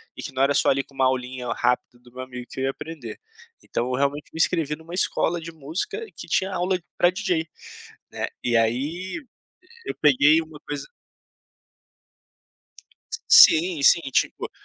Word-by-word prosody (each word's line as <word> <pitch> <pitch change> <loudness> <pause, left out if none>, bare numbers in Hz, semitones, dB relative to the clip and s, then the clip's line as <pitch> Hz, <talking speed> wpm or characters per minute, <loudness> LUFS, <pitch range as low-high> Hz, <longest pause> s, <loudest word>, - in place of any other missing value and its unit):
e - - -8
que - - -6
não 130 +1 +1
era 140 +1 +3
só - - +3
ali 135 0 +2
com 140 - -24
uma 135 -1 +1
aulinha 130 -1 -2
rápida 125 0 -1
do 120 0 -20
meu 130 +1 -8
amigo 125 -1 -8
que - - -8
eu 130 - 0
ia 135 - +1
aprender. 135 -7 -9 0.4
Então, 120 - -2
eu 130 - -3
realmente 140 +2 -1
me - - -8
inscrevi 165 -3 +1
em 160 - -18
uma 170 +2 -11
escola 175 -1 0
de 165 +1 -8
música 165 - -5
que - - -9
tinha 190 +1 0
aula 185 +1 0 0.2
pra 175 - +5
DJ, 180 -4 -1 0.6
né, - - -3 0.2
e 120 -1 +2
aí 120 +5 +1 1.0
e - - -5
eu - - -3
peguei 150 +2 +5
uma 160 -2 -10
coisa 145 -2 -5 2.4
Sim, 165 -1 +7
sim. 170 - +7
Tipo, - - 0
145 Hz, 175 wpm, -24 LUFS, 130-165 Hz, 2.4 s, Sim